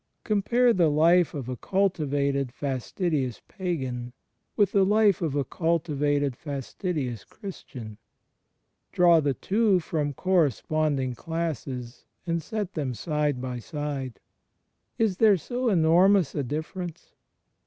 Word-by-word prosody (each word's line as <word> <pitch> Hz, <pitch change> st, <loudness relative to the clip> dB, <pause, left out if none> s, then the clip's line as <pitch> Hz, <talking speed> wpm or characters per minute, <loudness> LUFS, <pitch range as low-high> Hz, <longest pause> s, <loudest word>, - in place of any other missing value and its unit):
Compare 235 Hz, +4 st, +3 dB
the 175 Hz, -5 st, +3 dB
life 165 Hz, +2 st, +4 dB
of 135 Hz, -4 st, -5 dB
a 130 Hz, -, -3 dB
cultivated 140 Hz, -7 st, 0 dB
fastidious 135 Hz, -, -2 dB
pagan 130 Hz, -, -4 dB, 0.4 s
with 205 Hz, -3 st, +3 dB
the 195 Hz, -, +4 dB
life 205 Hz, -1 st, +3 dB
of 155 Hz, -5 st, -1 dB
a 145 Hz, -, +1 dB
cultivated 145 Hz, -4 st, 0 dB
fastidious 140 Hz, -, -4 dB
Christian. 125 Hz, -, -9 dB, 0.9 s
Draw 175 Hz, -2 st, +5 dB
the 140 Hz, -3 st, 0 dB
two 205 Hz, -, +2 dB
from 150 Hz, -3 st, -2 dB
corresponding 155 Hz, -, +1 dB
classes 135 Hz, -5 st, -5 dB, 0.2 s
and 170 Hz, -1 st, -1 dB
set 210 Hz, -1 st, -4 dB
them 135 Hz, -6 st, -2 dB
side 150 Hz, +2 st, -1 dB
by 125 Hz, -1 st, -4 dB
side. 140 Hz, -2 st, -5 dB, 0.8 s
Is 215 Hz, -5 st, +1 dB
there 210 Hz, -3 st, +5 dB
so 245 Hz, +7 st, -2 dB
enormous 180 Hz, -1 st, +4 dB
a 145 Hz, -, -1 dB
difference? 160 Hz, +5 st, -5 dB
155 Hz, 115 wpm, -26 LUFS, 135-185 Hz, 0.9 s, Draw